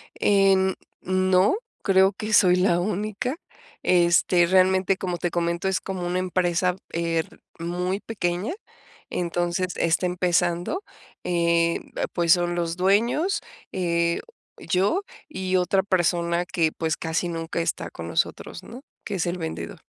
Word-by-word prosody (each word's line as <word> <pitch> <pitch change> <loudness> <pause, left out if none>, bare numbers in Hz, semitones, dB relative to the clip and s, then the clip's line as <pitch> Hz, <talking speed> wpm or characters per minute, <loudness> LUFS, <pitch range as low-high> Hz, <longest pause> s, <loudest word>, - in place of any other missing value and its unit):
Em, 195 -1 +3 0.3
no, 185 - +3 0.3
creo 190 0 +4
que 215 +2 -4
soy 180 -3 +6
la 180 -2 +3
única. 215 +7 -2 0.5
Este, 175 0 +4
realmente, 185 +1 +3
como 180 -3 -3
te 175 0 -2
comento, 170 +1 -1
es 190 -1 +1
como 185 -2 -4
una 180 +1 -1
empresa, 180 -1 +1
er 165 -1 -2 0.2
muy 180 +3 -2
pequeña, 195 - -2 0.6
entonces, 175 +1 -1
está 170 +2 +1
empezando. 175 - 0 0.4
Em, 170 -1 +1 0.2
pues, 170 -1 +4
son 175 -1 0
los 170 -1 -1
dueños, 230 - +2 0.3
eh, 170 -2 0 0.4
yo 330 - 0 0.3
y 190 -10 -2
otra 190 +1 +2
persona 175 -2 +1
que, 165 -3 0
pues, 160 0 -2
casi 165 +2 -2
nunca 165 0 -3
está 165 - -2
con - - -8
nosotros, - - -2
¿no?, 245 +3 -10 0.2
que 205 - -3
es 180 - -1
el 175 +1 -2
vendedor. 160 -2 -6
180 Hz, 130 wpm, -24 LUFS, 170-190 Hz, 0.6 s, soy